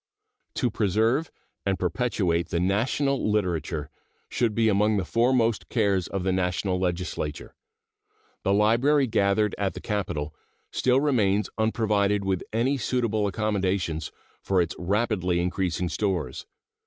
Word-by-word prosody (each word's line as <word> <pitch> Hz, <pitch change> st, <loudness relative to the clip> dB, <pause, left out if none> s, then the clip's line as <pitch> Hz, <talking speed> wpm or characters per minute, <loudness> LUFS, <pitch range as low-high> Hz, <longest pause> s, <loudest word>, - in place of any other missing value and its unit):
To 120 Hz, -, 0 dB
preserve 110 Hz, -, +1 dB, 0.3 s
and 95 Hz, -1 st, 0 dB
perpetuate 90 Hz, -3 st, 0 dB
the 85 Hz, -, 0 dB
national 120 Hz, +8 st, +1 dB
literature 85 Hz, -7 st, -1 dB, 0.4 s
should 115 Hz, -4 st, 0 dB
be 115 Hz, -1 st, +3 dB
among 105 Hz, +1 st, +3 dB
the 95 Hz, -, -1 dB
foremost 115 Hz, 0 st, +1 dB
cares 100 Hz, -6 st, +1 dB
of 95 Hz, -2 st, -3 dB
the 95 Hz, -, +1 dB
National 90 Hz, 0 st, 0 dB
Legislature. 85 Hz, -4 st, -3 dB, 0.9 s
The 95 Hz, -, 0 dB
library 120 Hz, +8 st, +3 dB
gathered 105 Hz, -2 st, +1 dB
at 100 Hz, -2 st, -1 dB
the -, -, -5 dB
Capitol 85 Hz, -9 st, -3 dB, 0.4 s
still 130 Hz, +1 st, +2 dB
remains 110 Hz, -8 st, +1 dB
unprovided 105 Hz, -2 st, +1 dB
with 95 Hz, -2 st, 0 dB
any 120 Hz, +5 st, +1 dB
suitable 115 Hz, -5 st, 0 dB
accommodations 95 Hz, -6 st, -1 dB, 0.3 s
for 95 Hz, -1 st, +1 dB
its 85 Hz, -2 st, 0 dB
rapidly 90 Hz, -2 st, 0 dB
increasing 90 Hz, 0 st, -1 dB
stores. 95 Hz, +1 st, -2 dB
100 Hz, 125 wpm, -26 LUFS, 90-115 Hz, 0.9 s, be